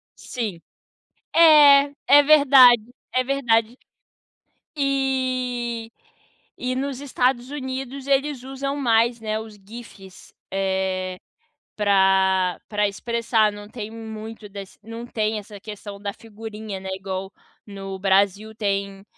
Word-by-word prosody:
Sim, 215 -9 -5 0.7
é, 295 -4 +7 0.2
é 290 +1 +7
verdade, 275 -5 +7 0.3
é 255 0 +1
verdade. 240 -4 +1 1.0
E 255 -4 -1 0.7
e 255 0 -1
nos 270 0 -3
Estados 255 -2 0
Unidos 265 -1 -5
eles 275 -1 0
usam 275 +1 -4
mais, 235 -3 +2
né, 215 0 -2
os 220 -1 -10
GIFs, 200 -2 -13 0.2
eh, 190 -1 -2 0.6
pra 190 -3 +3
pra 210 -1 +1
expressar, 225 +1 0
não 205 0 -10
tem 215 -1 -7
muito 220 -1 -9
das 200 -1 -10
não 230 +2 -8
tem 215 -2 -1
essa 205 -1 -11
questão 205 -1 -9
da 200 0 -4
figurinha, 215 -2 -8
né, 190 - -8
igual 190 0 -5 0.4
no 195 -2 -7
Brasil 200 +2 +1
tem, 200 -2 -3
225 Hz, 115 wpm, -23 LUFS, 200-255 Hz, 1.0 s, é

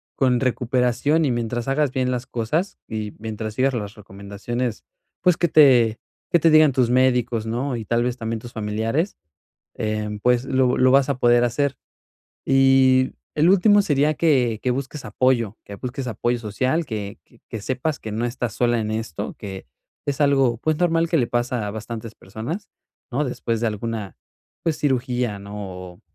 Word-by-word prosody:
con 125 -2 +2
recuperación 130 +4 +1
y 135 - +1
mientras 120 0 -2
hagas 140 0 +1
bien 130 -1 0
las 125 0 -3
cosas 150 - -2
y 110 -2 -4
mientras 110 -1 -5
sigas 130 +2 +2
las 105 -1 -4
recomendaciones, 105 +4 -5 0.4
pues, 180 -2 +4
que 175 - +1
te 120 -7 +5 0.3
que 170 - +5
te 165 +1 +4
digan 155 -2 +6
tus 125 -3 +2
médicos, 125 -3 +2
¿no?, 125 +4 -2
y 110 - -6
tal 120 +2 +1
vez 125 0 -2
también 115 -1 -3
tus 120 +2 -10
familiares, 110 - -1 0.6
eh, 110 -1 -2
pues, 125 0 +3
lo 130 -1 +2
lo 130 0 +5
vas 135 +1 +4
a 130 - -1
poder 120 0 +4
hacer. 140 +3 0 0.7
Y 135 -1 +4 0.2
el 155 +4 +4
último 205 +2 +5
sería 150 -4 +2
que, 125 -9 +2
que 125 - +1
busques 135 +3 -4
apoyo. 115 -1 +1
Que 100 - -8
busques 125 +4 -5
apoyo 120 +1 -1
social, 130 +9 -1
que 105 -2 -5 0.3
que 110 -3 -5
sepas 130 +6 -2
que 110 - -7
no 110 +3 -2
estás 120 -2 -3
sola 120 -1 +1
en 110 0 -3
esto. 110 -7 -4
Que 95 -1 -8 0.4
es 145 +1 -2
algo, 135 -5 +3
pues, 155 +2 0
normal 165 -1 +2
que 165 - +2
le 125 -5 +1
pasa 120 -2 -1
a 100 - -3
bastantes 110 +1 -7
personas, 120 - -6 0.4
¿no? 145 +5 0
Después 115 -3 -2
de 115 - +1
alguna, 110 -1 -4 0.5
pues, 160 -2 0
cirugía, 125 -5 0
¿no? 100 +1 -10
O 90 -3 -8
125 Hz, 175 wpm, -22 LUFS, 110-135 Hz, 0.7 s, digan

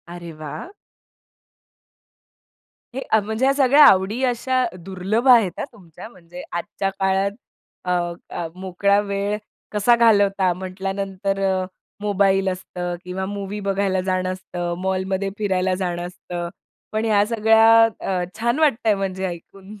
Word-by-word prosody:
अरे 170 -1 -8
वाह! 155 - -6 2.3
हे 270 - -3 0.2
म्हणजे 220 +5 -1
ह्या 275 - +4
सगळ्या 285 +1 +6
आवडी 195 +6 +4
अशा 255 +1 0 0.2
दुर्लभ 195 +7 -2
आहेत 230 -7 +6
हा, - - -1
तुमच्या 175 -3 -12
म्हणजे 175 -3 -12
आजच्या 175 +3 -3
काळात 195 +1 +1 0.5
अ, 180 - -1 0.4
अ, 170 - -4
मोकळा 190 +2 +1
वेळ 200 0 -2 0.3
कसा 215 +3 +4
घालवता 200 -5 +3
म्हटल्यानंतर 195 +1 -3
अ, 190 -1 +1 0.4
मोबाईल 195 -2 +2
असतं 180 -1 -4
किंवा 185 +1 -4
मूव्ही 200 +1 -5
बघायला 195 -1 0
जाणं 185 0 -1
असतं, 175 -2 -5
मॉलमध्ये 190 +1 -1
फिरायला 190 -3 0
जाणं 175 -2 -3
असतं. 175 -1 -6 0.4
पण 220 +1 -1
ह्या 205 -2 +3
सगळ्या 225 0 +5 0.2
अ, 185 -2 -1 0.2
छान 235 +5 +1
वाटतंय 230 -8 +3
म्हणजे 190 -1 -3
ऐकून. 190 +4 -10
195 Hz, 125 wpm, -22 LUFS, 185-215 Hz, 2.3 s, सगळ्या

